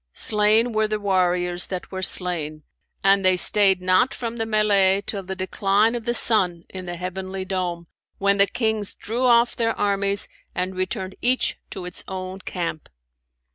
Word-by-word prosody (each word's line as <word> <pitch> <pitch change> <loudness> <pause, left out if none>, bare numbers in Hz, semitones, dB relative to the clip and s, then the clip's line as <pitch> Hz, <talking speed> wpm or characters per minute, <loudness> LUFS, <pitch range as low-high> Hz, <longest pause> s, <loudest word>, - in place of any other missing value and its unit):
Slain 215 +3 +3
were 215 -1 +1
the 215 0 -3
warriors 180 -3 0
that 185 -2 -6
were 190 -1 -5
slain[FN#556] 165 -5 0 0.4
and 195 0 +3
they 185 0 +4
stayed 190 -1 +4
not 185 +8 +2
from 235 -1 -5
the 225 -1 -3
mellay 200 -3 +2
till 200 - -4
the 190 0 -6
decline 200 +3 +1
of 235 -2 -5
the 240 0 -1
sun 180 -8 +3
in 185 -1 -8
the 175 - -4
heavenly 185 +1 -6
dome, 180 -2 -3 0.3
when 200 0 +1
the 200 0 +4
Kings 220 -1 -2
drew 240 +4 -3
off 240 -1 +3
their 230 -1 -1
armies 200 0 +2 0.3
and 185 +1 -2
returned 185 0 -4
each 255 +2 0
to 185 - -7
its 180 - -3
own 185 0 -6
camp. 170 -4 -5
195 Hz, 170 wpm, -22 LUFS, 185-215 Hz, 0.4 s, they